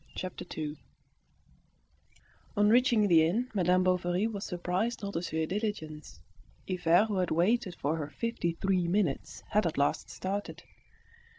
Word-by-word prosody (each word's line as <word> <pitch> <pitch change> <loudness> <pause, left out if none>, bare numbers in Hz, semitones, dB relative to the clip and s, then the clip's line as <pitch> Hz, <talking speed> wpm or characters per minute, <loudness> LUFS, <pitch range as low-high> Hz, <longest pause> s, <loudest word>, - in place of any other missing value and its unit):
Chapter 185 -1 -5
Two 150 -1 -5 1.8
On 205 0 +5
reaching 240 -3 +4
the 165 -4 +6
inn, 225 +11 0
Madame 185 -2 +3
Bovary 180 +1 +1
was 210 -3 -3
surprised 180 +7 -2
not 200 0 -4
to 165 - -1
see 160 -2 -1
the 190 +6 -2
diligence. 155 - -5 0.5
Hivert, 180 +2 +3
who 205 - -1
had 180 - 0
waited 185 +3 +1
for 150 +3 -1
her 150 -2 -4
fifty 230 -8 -2
three 185 0 0
minutes, 175 -5 -1
had 210 -3 +2
at 160 - -4
last 140 0 +1
started. 200 +2 -4
185 Hz, 150 wpm, -30 LUFS, 165-210 Hz, 1.8 s, the